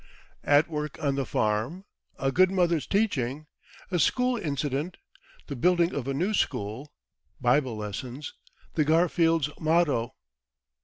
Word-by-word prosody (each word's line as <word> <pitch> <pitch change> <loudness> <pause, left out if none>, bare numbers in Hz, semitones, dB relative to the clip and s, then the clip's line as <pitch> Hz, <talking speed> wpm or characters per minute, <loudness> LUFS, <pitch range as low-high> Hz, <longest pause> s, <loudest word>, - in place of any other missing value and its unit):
At 145 +2 +4
Work 150 -2 -4
on 140 -2 0
the 135 -2 -2
Farm 110 - -1 0.3
A 135 0 0
Good 185 +5 +5
Mother's 175 -5 +1
Teaching 155 - 0 0.5
A 175 - +1
School 250 +7 +2
Incident 150 - -2 0.5
The 140 - -6
Building 175 +6 +2
of 135 -2 -3
a 135 - -1
New 185 +9 0
School 125 - -2 0.5
Bible 125 -2 +2
Lessons 120 +7 -6 0.4
The 155 - +2
Garfields' 165 -1 +2
Motto. 155 -7 +1
150 Hz, 125 wpm, -27 LUFS, 130-175 Hz, 0.5 s, Good